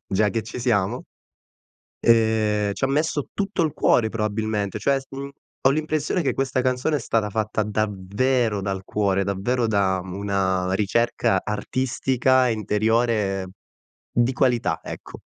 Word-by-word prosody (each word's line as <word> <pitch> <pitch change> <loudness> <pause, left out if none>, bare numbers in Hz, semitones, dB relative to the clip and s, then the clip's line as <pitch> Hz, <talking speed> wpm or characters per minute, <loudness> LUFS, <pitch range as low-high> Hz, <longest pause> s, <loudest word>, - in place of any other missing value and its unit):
già 105 +2 +2
che 115 +2 -2
ci 115 +3 -7
siamo, 105 -6 0 1.0
ehm, 110 -3 +3
c'ha 135 - 0
messo 145 +1 0
tutto 195 -3 -1
il 155 -3 0
cuore, 110 -7 +2
probabilmente. 105 -2 -2
Cioè, 135 +6 +1
s 135 - -17
mhmm, 140 +1 -6 0.4
ho - - +7
l'impressione 155 +3 0
che 135 - 0
questa 135 -1 0
canzone 130 +4 +1
è - - 0
stata 110 -2 0
fatta 110 +1 -1
davvero 105 +2 0
dal 95 -1 -3
cuore, 100 -1 0
davvero 110 +6 0
da 100 -3 +1
una 95 -1 -1
ricerca 105 -1 +1
artistica 130 +3 +1
interiore 110 -2 +1 0.7
di 120 +2 +2
qualità, 125 -3 +1
ecco. - - -9
110 Hz, 135 wpm, -23 LUFS, 100-130 Hz, 1.0 s, ho